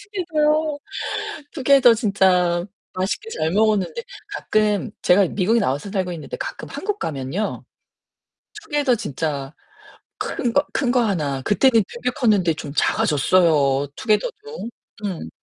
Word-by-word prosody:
투게더요. 310 -6 0 0.7
투게더 275 -4 +5
진짜 185 -5 +2 0.3
맛있게 205 - -2
잘 160 - -1
먹었는데 205 -1 +1 0.3
가끔 215 - 0
제가 195 +3 +5
미국에 210 +6 +1
나와서 145 - -1
살고 185 -3 -1
있는데 155 -4 -6
가끔 - - -6
한국 415 +1 -3
가면요 150 +7 -3 1.0
투게더 290 - +1
진짜 145 - -4 0.7
큰 240 - -2
거 285 +5 +3
큰 245 -3 +1
거 250 - +3
하나 150 - -1
그때는 225 - +4
되게 245 +1 -2
컸는데 200 -9 +2
좀 150 -2 -7
작아졌어요, 145 -3 +3
투게더도. 430 - -2 0.4
음. 170 - -5
205 Hz, 270 characters per minute, -22 LUFS, 165-255 Hz, 1.0 s, 투게더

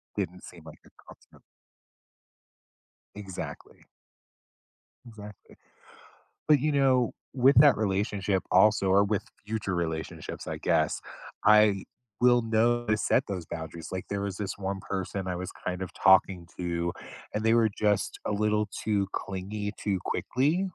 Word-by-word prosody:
didn't 90 +2 -4
seem 85 -3 -12
like 80 - -12
a - - -18 0.2
constant - - -17 1.7
Exactly. 95 -3 -8 1.2
Exactly, 105 -3 -12 0.9
but 150 -4 +5
you 150 +1 +1
know, 130 -4 +3 0.2
with 135 +2 +4
that 145 -1 +7
relationship 100 -1 0
also, 100 +1 +4
or 100 +2 +4
with 105 0 -1 0.2
future 105 -4 -2
relationships 80 -2 -4
I - - -4
guess, - - +1 0.4
I 105 -2 +5 0.4
will 120 -1 +5
know 115 +2 +1
to 110 0 +2
set - - +1
those 90 -4 -4
boundaries, 80 0 -7
like 95 - -4
there 100 0 -2
was 100 -2 -3
this 100 -2 -4
one 95 0 -4
person 95 0 -3
I 90 -1 -2
was 90 +1 -5 0.2
kind 90 0 -2
of 90 - -5
talking 95 -2 +4
to, 85 -1 -2 0.4
and 105 +1 -2
they 115 +1 +4
were 115 -2 +4
just 105 -2 0
a - - 0
little 105 0 +1 0.2
too 100 -2 +1
clingy 100 +2 -4
too 100 -3 -1
quickly 145 +9 0
100 Hz, 140 wpm, -28 LUFS, 95-110 Hz, 1.7 s, that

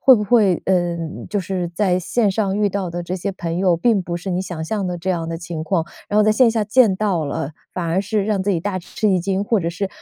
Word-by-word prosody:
会 265 -2 +8
不 210 -2 0
会 205 -5 +3
嗯， 175 -3 -1
就 210 - -1
是 185 -2 -2
在 180 +1 +1
线 205 +4 +1
上 195 -1 0
遇 205 -1 +3
到 195 -1 -2
的 175 0 -4
这 180 +2 -4
些 195 +2 -2
朋 175 -2 -4
友， 185 -3 +3
并 205 +2 +2
不 170 0 -4
是 185 +2 -5
你 180 +1 0
想 175 -4 -5
象 200 +1 -2
的 180 -1 -2
这 185 +3 -2
样 165 -2 -2
的 165 - -3
情 165 -2 -5
况， 165 0 0 0.2
然 210 - +2
后 210 - +5
在 215 - +4
线 235 +2 +5
下 220 -2 0
见 215 -3 +4
到 185 -7 0
了， 140 +1 -3 0.2
反 180 - -3
而 170 +3 +1
是 205 0 -1
让 205 -3 0
自 205 - 0
己 180 - +1
大 190 0 -2
吃 190 +4 -2
一 185 -2 +3
惊， 195 +2 -1
或 215 -1 +1
者 165 - -1
是， 190 +3 -3
190 Hz, 295 characters per minute, -20 LUFS, 175-205 Hz, 0.2 s, 会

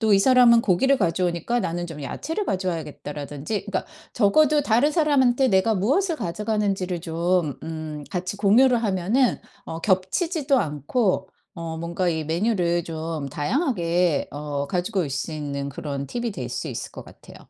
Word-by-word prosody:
또 220 -2 +3
'이 195 - +6
사람은 240 0 +6
고기를 265 +9 +3
가져오니까 180 +5 0
나는 175 -1 -2
좀 150 -3 -8
야채를 325 - -3
가져와야겠다.'라든지 155 - -4
그러니까 205 - -2 0.3
적어도 290 +7 +4
다른 245 +5 +3
사람한테 275 -5 +3
내가 195 +3 +3
무엇을 315 - +1
가져가는지를 195 - -1
좀 170 -2 0
음 155 -2 -6
같이 185 +2 -3
공유를 235 +4 +4
하면은 210 +6 +1 0.3
어 160 - -6
겹치지도 270 - +1
않고 185 - 0 0.3
어 165 -1 -5
뭔가 170 +2 -1
이 160 -2 -1
메뉴를 175 0 +1
좀 160 -3 -4
다양하게 175 - 0
어 145 -1 -3
가지고 185 +5 -1
올 160 - -1
수 140 +5 -3
있는 140 -2 -4
그런 140 0 -5
팁이 235 -2 -3
될 - - -5
수 - - -4
있을 - - -5
것 - - -9
같아요. - - -15
185 Hz, 345 characters per minute, -24 LUFS, 160-235 Hz, 0.3 s, 이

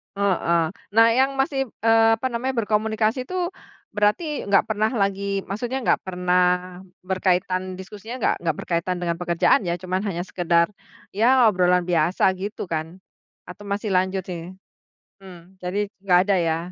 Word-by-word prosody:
Heeh. 185 -4 +1 0.3
Nah, 225 0 +7
yang 265 +4 +2
masih, 270 0 0 0.2
eee, 225 0 +5
apa 260 - -2
namanya, 255 +2 -2
berkomunikasi 220 +3 0
tuh, 360 +3 -2 0.4
berarti 215 +10 0
nggak 195 - +4
pernah 215 0 +1
lagi 195 0 -1
maksudnya 240 +6 -3
nggak - - +2
pernah 180 0 +1 0.6
berkaitan 185 0 -1
diskusinya 210 +6 -8
nggak - - +2
nggak 165 -3 -1
berkaitan 175 +1 -2
dengan 170 -1 -1
pekerjaan 170 -1 +3
ya, 170 - 0
cuman 185 +1 -2
hanya 175 -4 -2
sekedar, 170 -1 +1 0.4
ya 240 +4 +4
obrolan 180 -2 +2
biasa 170 0 +1
gitu 205 +2 -5
kan, 160 +2 -4 0.5
atau 205 +3 -10
masih 200 +1 -3
lanjut 190 +1 +1
sih? 175 -1 -6 0.7
Mmm, 180 -1 -14
jadi 200 +3 -1 0.2
nggak 180 -3 +4
ada - - +5
ya? 165 -1 0
195 Hz, 145 wpm, -23 LUFS, 180-220 Hz, 0.7 s, Nah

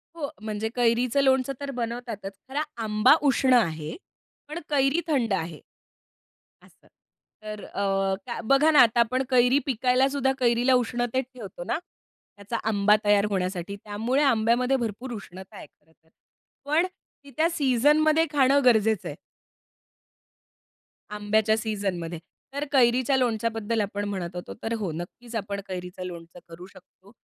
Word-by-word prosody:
हो, 295 -4 -4
म्हणजे 215 0 -3
कैरीचं 245 +2 +2
लोणचं 265 0 +2
तर 280 -1 -5
बनवतातच. 235 -4 -5 0.2
खरं 290 +3 -1 0.2
आंबा 215 +4 +4
उष्ण 270 -2 +3
आहे, 160 -10 +1 0.5
पण 310 +3 -5
कैरी 280 +2 +2
थंड 250 -9 +1
आहे, 165 -4 -3 1.0
असं. - - -23 0.6
तर 215 -1 -7
अ, 200 - -5 0.4
काय 235 - -4
बघा 275 +6 +4
ना 300 -3 +6
आता 235 0 +3
आपण 255 +3 +1
कैरी 250 +1 +4
पिकायला 255 +1 +2
सुद्धा 270 -1 0
कैरीला 245 +1 +3
उष्णतेत 245 +1 0
ठेवतो 200 -7 -8
ना, 195 - -1 0.6
त्याचा 205 +3 -5
आंबा 210 0 +4
तयार 205 0 +4
होण्यासाठी. 185 0 -3
त्यामुळे 225 +7 0
आंब्यामध्ये 250 +1 +2
भरपूर 240 +1 -4
उष्णता 190 -1 -10
आहे - - -10
खरं 160 - -33
तर. 160 0 -35 0.6
पण 310 +5 +2 0.4
ती 280 - -13
त्या 320 +2 +3
सीझनमध्ये 300 +2 +3
खाणं 280 0 +4
गरजेचं 220 -4 +3
आहे. - - -7 2.0
आंब्याच्या 215 +1 +1
सीझनमध्ये. 195 -7 -3 0.3
तर 285 +1 -2
कैरीच्या 255 0 +3
लोणच्याबद्दल 225 -2 0
आपण 205 0 -3
म्हणत 180 -3 -5
होतो. 175 - -6
तर 225 - -2
हो, 195 -6 -2
नक्कीच 205 +9 -8
आपण 200 -1 -3
कैरीचं 180 0 -6
लोणचं 170 -1 -9
करू 170 +2 -10
शकतो. 195 +1 -20
230 Hz, 140 wpm, -26 LUFS, 205-265 Hz, 2.0 s, ना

